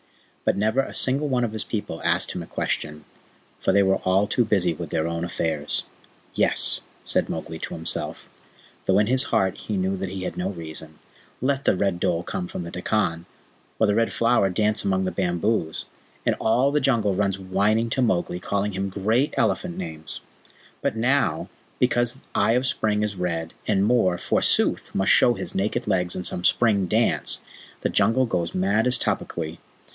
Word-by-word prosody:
But - - +2
never 110 +5 +1
a 135 - -1
single 140 +3 +1
one 125 -3 +1
of 110 -2 -2
his 110 - -3
people 105 -3 -4
asked - - +1
him - - -5
a - - -8
question, 75 0 -3 0.5
for - - +1
they 100 - +4
were 95 0 +3
all 95 +2 +2
too 120 - +1
busy 95 -6 +1
with - - -7
their 80 +1 0
own 85 0 -3
affairs. 80 -3 -2 0.5
"Yes," - - +2 0.2
said - - 0
Mowgli - - -5
to - - -5
himself, - - -2 0.6
though - - +4
in 105 - +4
his 130 +4 +5
heart 95 -5 +1
he 105 - -3
knew 95 +1 0
that 95 0 -4
he 95 0 -5
had - - -4
no 90 +2 -1
reason. 80 -3 -8 0.4
"Let 135 +1 0
the - - +4
Red 95 -2 0
Dhole 85 -1 0
come 90 0 -4
from 90 - -5
the 85 - -7
Dekkan, 90 -3 -1 0.5
or 110 - +3
the 105 - +2
Red 115 +2 +1
Flower 115 -4 +2
dance 105 +3 0
among 95 -1 +1
the 95 - -1
bamboos, 90 -1 -1 0.4
and - - +2
all 125 +5 +3
the 150 0 +1
Jungle 115 -7 +2
runs 100 0 0
whining 100 +5 +1
to 130 - +1
Mowgli, 90 -6 0
calling 100 +2 -1
him 95 0 -2
great 110 +8 0
elephant 180 -1 0
names. 80 - -6 0.6
But 110 - -1
now, 130 +5 +1 0.3
because 120 0 +1
Eye 115 - +3
of 125 +1 +2
the 130 - +1
Spring 105 -2 0
is 105 -1 -2
red, 85 -3 -3
and 100 -2 +2
Mor, 105 -6 +3
forsooth, - - +1
must 95 - +3
show 120 - +5
his - - -3
naked 105 +5 -1
legs 90 -3 +1
in 90 - -4
some 90 - -1
spring 100 -5 +3
dance, - - +1 0.4
the - - 0
Jungle 130 +3 +3
goes 85 -7 -2
mad 100 +5 +2
as 125 - +5
Tabaqui.... 80 0 -3
100 Hz, 190 wpm, -24 LUFS, 90-115 Hz, 0.6 s, his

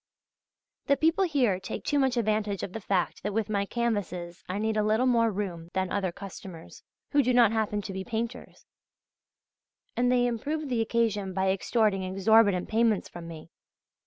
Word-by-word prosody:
The 280 - +4
people 325 +5 +3
here 250 - +1
take 190 - -6
too 290 - +1
much 265 -2 +1
advantage 215 -3 0
of 185 - -5
the 225 - -5
fact 190 -2 -1
that 205 +1 -3
with 225 -1 -1
my 200 -1 0
canvases 190 -8 -3
I 185 - -2
need 220 +1 -1
a 215 - +2
little 215 +4 +2
more 230 -2 +3
room 185 -5 -4
than 190 -1 -1
other 195 -3 -1
customers, 185 -3 -10 0.3
who 285 - +4
do 250 -1 +1
not 235 -4 +6
happen 210 -2 -1
to 195 - -6
be 190 0 -4
painters, 235 +2 -5 1.3
and 245 +1 +2
they 245 -1 +3
improve 285 +6 -2
the 240 -3 +1
occasion 220 -4 0
by 190 0 +2
extorting 200 0 +1
exorbitant 195 0 +3
payments 225 -2 +1
from 170 -1 -9
me.... 165 -1 -10
215 Hz, 175 wpm, -28 LUFS, 190-235 Hz, 1.3 s, not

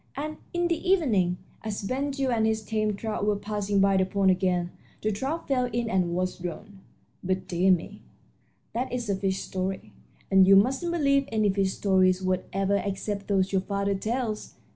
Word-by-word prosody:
And 305 +2 -4
in 345 0 0
the 340 +2 -2
evening, 210 - +2 0.3
as 215 -2 -4
Ben 265 +7 -1
Gile 275 -2 -1
and 220 -2 +2
his 220 0 0
tame 215 -1 -1
trout 215 0 -3
were 210 0 +2
passing 205 0 -1
by 195 0 +4
the 190 - +4
pond 195 0 +3
again, 180 -1 0 0.3
the 215 - +1
trout 270 +11 -3
fell 255 -3 +2
in 240 -2 -2
and 180 -3 +1
was 185 +1 -2
drowned. 180 +3 -7 0.4
But, 185 0 -2
dear 180 +1 +2
me, 180 -3 -1 0.7
that 255 +3 -2
is 240 -4 -2
a - - +1
fish 190 0 -1
story, 190 0 -4 0.4
and 190 -1 +6
you 195 - +8
mustn't 265 - +3
believe 280 -4 +2
any 215 -2 +2
fish 190 -1 0
stories 185 -2 +3
whatever 190 +2 0
except 200 0 -3
those 195 -1 +1
your 190 -1 +2
father 200 +1 -1
tells! 220 +2 -3
200 Hz, 185 wpm, -27 LUFS, 190-240 Hz, 0.7 s, you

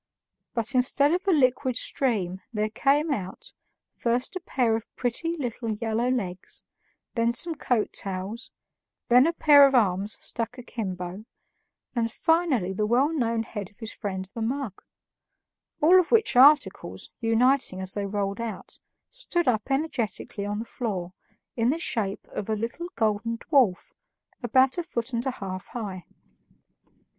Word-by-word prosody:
But 230 +2 -2
instead 275 +4 +3
of 365 +3 -2
a - - +5
liquid 255 -4 +2
stream 195 -10 0
there 215 -1 -1
came 290 +6 +2
out, 190 -8 -5 0.4
first 245 - -1
a - - -2
pair 245 -9 +1
of 225 0 -5
pretty 330 +8 -1
little 245 -4 -4
yellow 230 +2 -1
legs, 195 -8 -3 0.5
then 235 0 +1
some 340 +6 +1
coat 245 -7 -1
tails, 195 +5 -4 0.6
then 250 +4 +6
a - - +2
pair 290 -4 +7
of 270 - 0
arms 200 -2 +2
stuck 230 +1 -4
akimbo, 190 -5 -5 0.7
and 230 -1 0
finally 300 - +1
the 210 +2 0
well 260 +7 +3
known 230 -6 0
head 205 -4 -6
of 205 - -30
his 225 -2 -6
friend 190 -3 -4
the 230 - -5
mug 240 -3 -3 1.0
all 360 +5 +7
which 445 - +3
articles, 285 +4 +4
uniting 235 -2 +2
as 190 0 -4
they 200 -1 -2
rolled 200 +1 -2
out, 225 -5 -6 0.3
stood 355 -9 -2
up 225 0 +1
energetically 240 - -2
on 205 0 -2
the 225 - -4
floor 190 -8 -4 0.4
in 230 0 +2
the 300 - +1
shape 215 - -2
of 205 - -5
a 220 - +1
little 230 +11 -4
golden 225 +1 0
dwarf 245 - +2 0.5
about 260 +6 +3
a - - -1
foot 250 -7 -4
and 235 +3 -1
a - - +1
half 185 -3 -6
high. 200 -6 -6
235 Hz, 150 wpm, -26 LUFS, 205-270 Hz, 1.0 s, pair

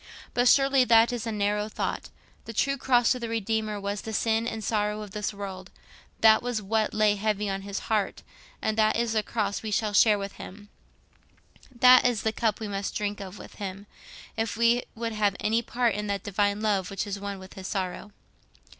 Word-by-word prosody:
But 245 +1 +2
surely 270 0 +5
that 230 0 +5
is 235 -1 -4
a - - -1
narrow 210 0 -1
thought. - - -4 0.4
The 230 - -7
true 275 +5 +1
cross 245 -2 +3
of 250 - -7
the 235 - -4
Redeemer 220 -1 -1
was 200 0 -3
the 220 - -6
sin 225 +1 +1
and 220 -2 -4
sorrow 210 0 -1
of 205 - -10
this 210 +1 -3
world—that 200 +2 -1
was 245 -2 -2
what 215 +2 0
lay 215 -1 +2
heavy 210 0 -1
on 195 0 -2
his 200 0 -5
heart—and 215 0 -3
that 215 0 +3
is 235 -1 0
the 215 - +2
cross 205 -2 -2
we 220 - -5
shall 210 0 0
share 210 0 +5
with 200 0 -6
him, 205 +2 -11 1.0
that 255 0 +6
is 245 -3 +1
the 220 - 0
cup 220 -3 0
we 220 - -4
must 200 -1 -4
drink 205 -1 -2
of 195 0 -8
with - - -12
him, 195 -1 -6 0.5
if 225 -2 -2
we 235 +1 +3
would 230 0 -3
have 205 -2 +1
any 225 +2 +1
part 235 -1 0
in 210 +1 -3
that 200 -2 -2
Divine 205 +1 0
Love 200 -4 0
which 195 +2 -3
is 200 -1 -4
one 200 0 -5
with 190 0 -12
his 190 0 -8
sorrow. 190 +1 -4
215 Hz, 200 wpm, -27 LUFS, 200-225 Hz, 1.0 s, that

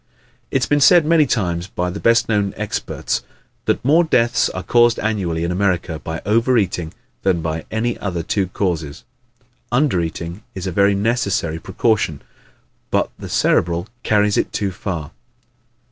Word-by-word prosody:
It 135 - +1
has - - +3
been 145 0 +2
said 170 +3 +6
many 155 -2 +4
times 90 -7 -1
by 90 -2 -2
the 100 - -6
best 115 0 +3
known 105 -3 0
experts - - -2 0.4
that 120 - 0
"more 160 +5 +5
deaths 120 -6 +2
are 95 - -5
caused 120 -1 +4
annually 95 -7 -1
in 85 - -1
America 90 -4 0
by 80 +1 -6
over 115 +4 +3
eating 90 -6 -1 0.3
than 90 -3 +1
by 80 0 -3
any 115 +2 -1
other 90 -4 -3
two 95 +2 0
causes." 85 -6 -3 0.7
Under 120 - +2
eating 85 +3 -5
is 95 -1 -5
a 95 - -2
very 100 +3 +3
necessary 100 -7 0
precaution 95 -5 0 0.7
but - - 0
the - - -7
Cerebral 85 +2 +1
carries 105 -2 +2
it - - 0
too 100 -2 -1
far. 85 -4 -5
100 Hz, 160 wpm, -20 LUFS, 85-115 Hz, 0.7 s, said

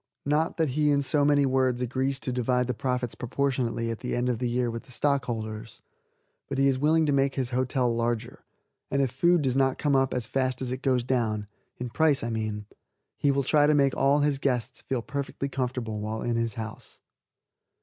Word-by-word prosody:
Not 150 +3 +1
that 160 -3 +1
he 150 +3 +1
in 140 -1 +2
so 145 +1 +2
many 145 -1 +4
words 130 -2 +1
agrees 130 +2 -1
to 125 - -3
divide 125 0 +1
the 125 - -1
profits 125 0 -2
proportionately 125 -3 -1
at 115 - -5
the 125 - -3
end 125 +1 0
of 120 -3 -1
the 125 - -1
year 120 0 0
with 115 0 -6
the - - -15
stockholders, 115 -5 -2 0.7
but 140 - -3
he 135 0 +4
is 130 -1 +1
willing 160 +3 +3
to 145 - +1
make 135 0 +2
his 130 -2 -2
hotel 125 -1 +1
larger, 115 -1 -2 0.5
and 140 0 +1
if 130 - -1
food 170 +5 +3
does 130 -2 0
not 135 -1 +2
come 145 -2 +1
up 135 0 +2
as 125 -3 -1
fast 130 +1 -1
as 130 -2 -3
it 130 0 -4
goes 130 -3 +1
down 115 -5 0 0.3
in 125 -1 -5
price, 155 -3 +2
I 115 - -2
mean 110 -2 -3 0.5
he 145 - +1
will 140 0 +2
try 145 +2 +4
to 150 - +4
make 140 -2 +3
all 140 +2 +3
his 145 -2 +1
guests 125 -3 -1
feel 125 -3 -3
perfectly 140 0 -4
comfortable 125 -5 -3
while 110 +1 -3
in 120 -1 0
his 115 -2 -1
house. 110 -1 -8
130 Hz, 210 wpm, -27 LUFS, 120-140 Hz, 0.7 s, many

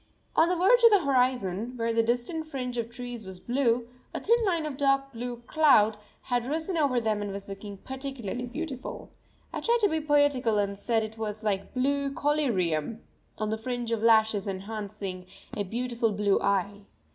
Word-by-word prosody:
On 325 +2 +5
the 360 - +2
verge 390 +8 +5
of 465 - +10
the 400 -7 +4
horizon, 250 -5 +1
where 230 0 0
the 230 - +4
distant 245 +8 -1
fringe 255 -4 -4
of 230 0 -3
trees 245 -1 -6
was 190 -2 -9
blue, 240 0 +1 0.3
a - - -1
thin 470 +1 +3
line 340 -5 +1
of 300 -3 -4
dark 275 0 +1
blue 240 0 -6
cloud 260 -9 +5 0.3
had 245 -1 -1
risen 320 +5 -1
over 280 -6 +2
them 215 -2 0
and 205 -1 -3
was 200 0 -6
looking 200 0 -7
particularly 260 -1 -5
beautiful. 270 0 -6 0.4
I - - -2
tried 470 +1 +3
to 410 - +4
be 315 -2 0
poetical 290 -7 +3
and 200 -1 0
said 225 +2 0
it 220 +1 -7
was 215 0 -4
like 200 0 -2
blue 280 +2 +1
collyrium 225 - 0 0.3
on 215 0 -2
the 220 - -2
fringe 245 0 -3
of 225 -2 0
lashes 220 -3 +4
enhancing 195 -1 -5 0.3
a - - -2
beautiful 235 +2 -1
blue 205 -1 +2
eye. 200 +1 0
240 Hz, 180 wpm, -28 LUFS, 210-275 Hz, 0.4 s, of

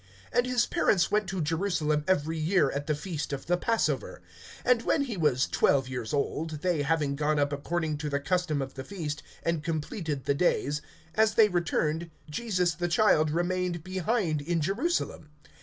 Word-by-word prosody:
(41)And 245 - +3
his 250 -1 +2
parents 185 -5 +2
went 210 -2 +1
to 190 -4 -2
Jerusalem 155 -2 0
every 165 -3 +1
year 155 -3 +3
at 145 +1 -4
the 150 - +1
feast 155 -1 -4
of 140 -1 -4
the 175 - +2
passover. 155 - -1 0.4
(42)And 250 -2 +4
when 285 - +2
he 245 -6 -4
was 145 -7 +2
twelve 135 -2 +2
years 125 -4 -4
old, 150 +2 -2
they 175 -5 +1
having 145 -1 +1
gone 150 +1 +1
up 145 0 +1
according 155 +1 -2
to 150 0 -3
the 140 0 0
custom 155 -2 0
of 135 - -8
the 130 - -6
feast, 155 -4 -5 0.2
(43)and 165 -2 0
completed 155 -2 -3
the 140 - +2
days, 150 -2 +1 0.3
as 220 +3 +3
they 220 -2 +6
returned, 170 -2 0 0.2
Jesus 180 0 0
the 175 +1 -2
child 170 -4 +4
remained 175 +1 -1
behind 185 -3 0
in 165 +3 0
Jerusalem. 195 - -1
165 Hz, 175 wpm, -28 LUFS, 150-185 Hz, 0.4 s, they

